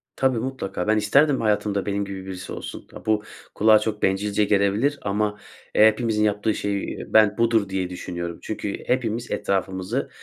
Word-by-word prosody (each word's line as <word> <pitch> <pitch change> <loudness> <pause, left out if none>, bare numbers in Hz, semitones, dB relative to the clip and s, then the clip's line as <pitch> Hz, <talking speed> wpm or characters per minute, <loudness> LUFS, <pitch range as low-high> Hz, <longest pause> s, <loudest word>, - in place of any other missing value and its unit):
Tabii, 130 -2 +1
mutlaka. 110 -7 -4
Ben 110 0 +3
isterdim 135 +7 +3
hayatımda 105 -2 0
benim 100 0 -1
gibi 95 -1 -7
birisi 95 -1 -7
olsun. - - -8
A, - - -11
bu 110 -1 +1 0.3
kulağa 110 0 +6
çok 105 0 -3
bencilce 100 +2 +1
gelebilir 105 +8 +2
ama, 105 +1 -1 0.4
eee, 110 - +8
hepimizin 110 -1 +1
yaptığı 105 +1 +1
şey 100 -1 -3
ben 105 -1 +4
budur, 115 -3 +2
diye 95 -1 -2
düşünüyorum. 85 -1 -5
Çünkü 105 -2 -4
hepimiz 120 -2 -1
etrafımızı 95 +4 -1
105 Hz, 160 wpm, -23 LUFS, 100-110 Hz, 0.4 s, eee